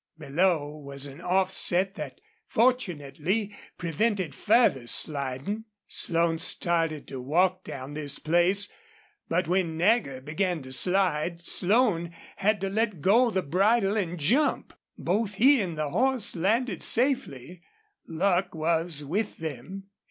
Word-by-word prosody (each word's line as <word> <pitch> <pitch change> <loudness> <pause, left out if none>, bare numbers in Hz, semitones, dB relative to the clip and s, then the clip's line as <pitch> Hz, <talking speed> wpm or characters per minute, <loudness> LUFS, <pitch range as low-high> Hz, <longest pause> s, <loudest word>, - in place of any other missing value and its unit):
Below 155 0 0
was 140 -1 -6
an 140 0 -9
offset 190 0 +1
that 145 -7 -8 0.3
fortunately 200 - 0 0.2
prevented 180 0 -1
further 210 - +2
sliding, 140 - -1 0.2
Slone 165 -1 0
started 165 -3 -1
to 135 -2 -6
walk 180 +7 +1
down 140 -1 -8
this 145 -2 -2
place, 175 +5 +2 0.6
but 175 +1 0
when 175 -2 0
Nagger 175 - +1
began 160 +3 -2
to 130 - -11
slide 170 +2 +1
Slone 175 -3 +2 0.2
had 210 +1 +1
to 195 - -1
let 215 -5 -1
go 230 - +4
the 190 -4 -1
bridle 195 +6 +2
and 180 -5 -2
jump. 250 - +1 0.2
Both 205 +3 -1
he 260 +4 +5
and 170 -5 -4
the 150 -2 -2
horse 255 +1 +1
landed 205 +3 0
safely. 185 - +1 0.5
Luck 180 +2 0
was 160 -1 0
with 205 +9 -2
them. 160 +5 -7
175 Hz, 125 wpm, -27 LUFS, 155-205 Hz, 0.6 s, he